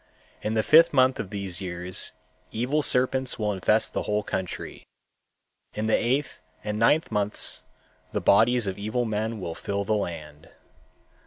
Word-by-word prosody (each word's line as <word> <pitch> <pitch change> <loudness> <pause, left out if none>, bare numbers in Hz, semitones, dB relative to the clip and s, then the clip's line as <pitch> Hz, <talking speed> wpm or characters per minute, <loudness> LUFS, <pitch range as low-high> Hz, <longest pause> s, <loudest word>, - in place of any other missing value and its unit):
In 110 +1 -2
the 110 - +2
fifth 165 +5 +6
month 130 -1 +3
of 95 - -4
these 100 -2 -4
years 90 0 -3 0.4
evil 125 +7 0
serpents 130 -1 +2
will 105 -2 -1
infest 105 +3 +1
the - - -1
whole 105 0 -1
country. 95 -2 -5 0.9
In 105 - -2
the 110 - +3
eighth 135 +4 -1 0.2
and 105 0 -3
ninth 150 +8 +3
months 105 0 +2 0.5
the - - -1
bodies 120 +4 +3
of 95 0 -4
evil 110 +4 -2
men 110 0 -3
will 85 -3 -5
fill 100 +4 -3
the 110 - -1
land. 80 -7 -5
105 Hz, 155 wpm, -25 LUFS, 100-125 Hz, 0.9 s, fifth